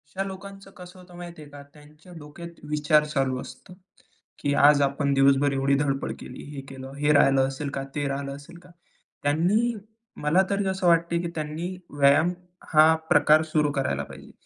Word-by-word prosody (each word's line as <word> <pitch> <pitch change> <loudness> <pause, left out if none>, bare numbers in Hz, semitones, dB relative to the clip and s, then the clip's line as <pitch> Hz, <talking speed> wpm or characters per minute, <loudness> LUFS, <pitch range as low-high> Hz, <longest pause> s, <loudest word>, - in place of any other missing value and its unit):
अशा 195 - -1
लोकांचं 195 0 -10
कसं 180 0 -12
होतं 180 -1 -15
माहिती 175 -2 -9
आहे 150 - -12
का? 145 0 -11
त्यांच्या 150 +3 -18
डोक्यात 160 +3 -10 0.2
विचार 150 0 +3
चालू 135 -4 -1
असतो 180 - -12 0.7
की 145 - -1
आज 145 0 +5
आपण 140 0 0
दिवसभर 135 +1 +3
एवढी 135 +1 +1
धडपड 135 -1 -1
केली, - - -10
हे 135 - -6
केलं, 135 0 -9
हे 145 +1 +2
राहिलं 135 -2 +4
असेल 135 +2 -5
का? 135 - -3
ते 145 -1 -1
राहिलं 140 0 -4
असेल 145 +4 -13
का? 180 +1 -19 0.5
त्यांनी 180 +11 +1 0.5
मला 155 +6 +3
तरी 200 -1 -1
असं 190 -1 -1
वाटतंय 170 0 +2
की 170 - -4
त्यांनी 155 +4 -4 0.2
व्यायाम 145 +5 +4 0.4
हा 155 +1 +7 0.2
प्रकार 155 -2 +5
सुरू 150 -2 +2
करायला 130 - -2
पाहिजे. - - -13
150 Hz, 175 wpm, -25 LUFS, 140-175 Hz, 0.7 s, हा